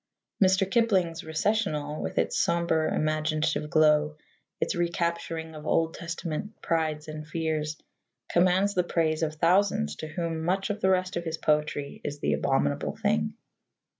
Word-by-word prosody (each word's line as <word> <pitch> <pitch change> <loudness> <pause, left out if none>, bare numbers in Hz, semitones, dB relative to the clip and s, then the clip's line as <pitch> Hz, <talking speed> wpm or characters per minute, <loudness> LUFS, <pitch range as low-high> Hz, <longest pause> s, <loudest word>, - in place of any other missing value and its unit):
Mr. 190 0 +4
Kipling's 195 -7 +1
Recessional, 160 -3 -1
with - - -4
its - - +1
sombre 170 -2 +1
imaginative 155 0 0
glow, 150 -1 +4 0.4
its - - 0
recapturing 170 -1 -2
of 150 -1 -9
Old 165 0 +2
Testament 170 +4 -5
prides 155 -2 -1
and 155 0 -7
fears, 155 -1 -2 0.5
commands 185 +3 +3
the 180 - +2
praise 160 -2 0
of 155 -1 -1
thousands 165 - +2
to 155 - -5
whom 165 0 -3
much 190 +4 0
of 205 - -5
the 190 - +3
rest 185 -1 +1
of 170 - -2
his 160 -1 -3
poetry 150 -2 0
is 145 0 -4
the 75 - 0
abominable 70 0 0
thing. 75 0 0
160 Hz, 145 wpm, -27 LUFS, 155-175 Hz, 0.5 s, Mr